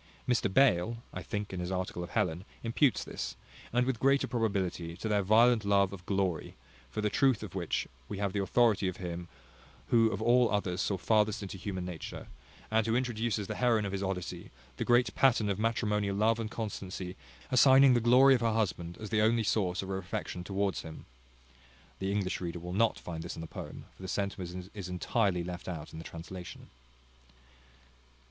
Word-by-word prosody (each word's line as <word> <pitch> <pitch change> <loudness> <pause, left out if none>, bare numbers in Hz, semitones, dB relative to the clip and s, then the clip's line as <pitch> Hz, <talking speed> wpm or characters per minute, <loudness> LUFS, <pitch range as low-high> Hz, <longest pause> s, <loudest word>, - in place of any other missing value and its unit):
Mr 120 -5 +2
Bayle 115 -3 +3 0.2
(I - - -5
think, 105 -2 -4
in 95 - -3
his 90 +1 -3
article 90 -1 -3
of 85 - -7
Helen) 85 +1 0 0.2
imputes 120 +1 +2
this, - - -5 0.4
and 125 +1 +2
with 130 -3 -1
greater 135 +1 +3
probability, 95 -8 -2
to 110 - -4
their 105 -2 +2
violent 110 +3 +5
love 100 -1 +3
of 90 -2 -10
glory; 95 -5 -1 0.3
for 110 - -3
the 105 - +1
truth 135 -5 +3
of - - -7
which, - - -2 0.2
we 105 - -4
have 100 -1 -1
the 100 - 0
authority 105 0 +3
of 95 - -3
him 85 -1 -5 0.6
who 115 -1 +5
of 100 - -3
all 120 +2 +4
others 95 -3 0
saw 100 -1 0
farthest 105 +2 +2
into 95 - -6
human 95 -1 -4
nature, 90 -4 -6 0.5
and 110 0 +2
who 115 - +2
introduces 120 -4 -1
the - - -4
heroine 115 -4 +2
of 100 - -3
his 100 0 -3
Odyssey, 90 -2 -4 0.3
the - - -1
great 120 +1 +3
pattern 115 -6 +3
of 100 0 -1
matrimonial 105 -3 0
love 110 +3 +2
and 110 -1 -3
constancy, 95 -5 -5 0.4
assigning 130 +1 +7
the 120 - +4
glory 125 +4 +7
of 125 - +2
her 115 -1 +2
husband 90 -6 -1
as 110 0 -7
the 110 -1 +3
only 115 +1 +3
source 95 -4 0
of 95 - -7
her 95 0 -1
affection 90 -2 -5
towards 100 +1 -1
him.[*] 80 -1 -10 0.4
[*] 65 -1 -28
The 95 0 -1
English 100 -3 -1
reader 85 -1 -3
will 90 +1 -6
not 115 +4 +2
find 80 -2 -6
this 85 +2 -6
in - - -7
the - - -5
poem; - - -8
for - - -16
the 95 - -6
sentiment 95 -1 -4
is 100 -4 -6
entirely 90 0 0
left 90 +1 -6
out 80 -4 -6
in 80 - -7
the - - -7
translation. 90 +2 -9
100 Hz, 195 wpm, -31 LUFS, 90-115 Hz, 0.6 s, assigning